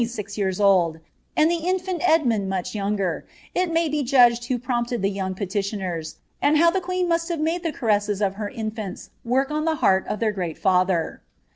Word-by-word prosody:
117 210 -3 -3
years 190 -1 -1
old, 180 -5 +3 0.4
and 310 +2 +4
the 345 - +1
in&nt 365 -1 -1
Edmund 245 - +2
much 190 -2 -3
younger, 200 -4 -2 0.3
it 360 -1 0
may 330 0 +2
be 300 0 -1
judged 240 -3 +4
who 250 0 -1
|>rofnpted 240 -2 -2
the 195 - +2
young 190 -1 -3
petitioners, 190 -4 -3 0.3
and 300 +1 +4
how 335 +2 +5
the 380 - -1
queen 365 0 -1
must 335 0 0
have 335 -2 -2
made 325 +3 0
the 330 -2 -2
caresses 210 -6 0
of 200 -2 +1
her 205 0 -4
infants 215 -4 -6
work 265 +4 +1
on 305 0 -1
the 320 -1 +1
heart 190 -9 +3
of 210 - -3
their 225 -2 +1
great 180 -5 -4
father. 185 -3 +1
225 Hz, 195 wpm, -23 LUFS, 195-310 Hz, 0.4 s, how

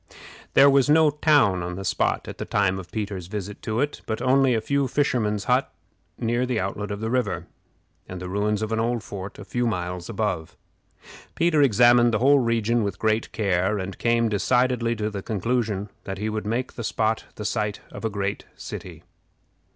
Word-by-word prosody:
There 140 - +8
was 140 -1 +4
no 155 0 +5
town 145 - +3
on 90 +1 -4
the 95 +1 -6
spot - - 0
at - - -8
the - - -3
time 95 -2 +1
of 90 - -11
Peter's 100 -5 -4
visit 105 0 -6
to 110 +3 -1
it, 145 0 -2
but 110 - -2
only 130 -1 +3
a - - +2
few 140 +3 0
fishermen's 115 -7 0
huts - - +2 0.5
near 120 +2 0
the 120 -3 0
outlet 100 +1 -3
of 100 0 -5
the 110 0 -2
river, 125 -5 -1 0.6
and 90 - -6
the 90 - -6
ruins 105 +3 0
of 110 - -3
an 110 - 0
old 115 0 0
fort 95 0 -7
a 100 - -9
few 120 +3 -1
miles 90 -4 -3
above. 95 -8 -3 0.8
Peter 165 -3 +3
examined 120 -1 +5
the - - +2
whole 140 +3 +5
region 115 -1 +1
with 100 -2 -3
great 110 0 0
care, 100 -1 +1
and 95 -2 -5
came 115 0 +2
decidedly 120 +2 +1
to 105 -1 -2
the 100 -2 -5
conclusion 110 -1 -1 0.2
that 95 0 -4
he 105 +3 -2
would 110 -1 -3
make 120 +4 -2
the 115 - -6
spot 110 0 0
the 105 - -6
site 105 -2 -2
of - - -9
a 110 - 0
great 100 -1 -3
city. - - -8
110 Hz, 195 wpm, -24 LUFS, 100-120 Hz, 0.8 s, There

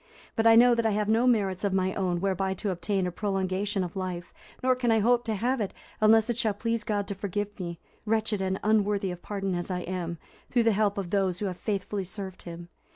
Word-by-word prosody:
But 225 0 +3
I 225 - +8
know 240 +1 +7
that 230 -1 +1
I 220 -2 +2
have 210 -1 0
no 225 +3 +3
merits 200 -6 +2
of 200 -2 +1
my 190 0 +1
own 180 -3 -1
whereby 190 0 0
to 200 +2 -2
obtain 185 +2 -1
a 180 - -2
prolongation 195 +1 -1
of 175 +1 -6
life, 180 -2 -4 0.3
nor 255 0 +4
can 250 -1 0
I 225 - +4
hope 240 +3 +3
to 220 -2 0
have 245 +4 0
it, 200 - -3 0.3
unless 220 +1 +6
it 240 -1 -1
shall 215 -3 +1
please 230 +1 -1
God 205 -2 -1
to - - -1
forgive 205 +1 -4
me, 170 -2 -4 0.3
wretched 220 -2 0
and 190 0 -1
unworthy 205 -2 +2
of 175 0 -8
pardon 195 -2 -3
as 175 +1 -3
I 180 -1 -2
am, 175 -2 -4 0.3
through 240 -2 +3
the 225 - +4
help 205 -1 +1
of 185 -3 -3
those 190 -3 +1
who 205 - -3
have 185 -2 -3
faithfully 200 -1 -2
served 190 0 -6
him. 170 0 -9
200 Hz, 235 wpm, -28 LUFS, 185-220 Hz, 0.3 s, I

